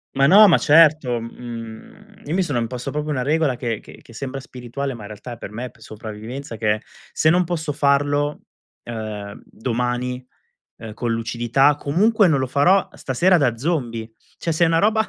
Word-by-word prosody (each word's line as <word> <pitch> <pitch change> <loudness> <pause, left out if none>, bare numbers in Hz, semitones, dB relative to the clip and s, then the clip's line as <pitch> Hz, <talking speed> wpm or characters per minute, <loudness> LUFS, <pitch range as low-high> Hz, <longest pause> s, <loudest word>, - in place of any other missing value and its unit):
Ma 135 0 +4
no, 205 +7 +8
ma 170 - +6
certo, 150 -5 +4
mhmm, 115 - -10
io 150 - -3
mi 190 - +2
sono 150 -8 -1
imposto 120 +1 -4
proprio 150 0 -3
una 130 -3 -1
regola 150 -2 +1
che 120 -3 -3
che - - -14
che 115 - -17
sembra 135 +3 -5
spirituale, 130 +2 -6
ma 115 - -10
in 105 - -8
realtà 105 +4 -8
è - - -10
per 100 - -8
me 120 +4 -5
p - - -24
sopravvivenza 110 +4 -8
che 105 -1 +2
è: - - -8 0.3
se 155 - +2
non 180 +3 +4
posso 160 -3 -3
farlo, 145 +1 +1 0.4
ehm, 110 -3 -6
domani, 125 +1 -3 0.5
ehm, 110 -2 -9
con 120 0 -2
lucidità 120 +5 +2
comunque 200 +9 +3
non 150 -6 +2
lo 130 - 0
farò 175 +9 +3
stasera 175 +8 +2
da 125 -6 +1
zombie. 120 -6 -2 0.3
Cioè 170 - -2
se 160 +2 +3
una 165 0 +3
roba 220 +3 +2
130 Hz, 185 wpm, -21 LUFS, 115-155 Hz, 0.5 s, no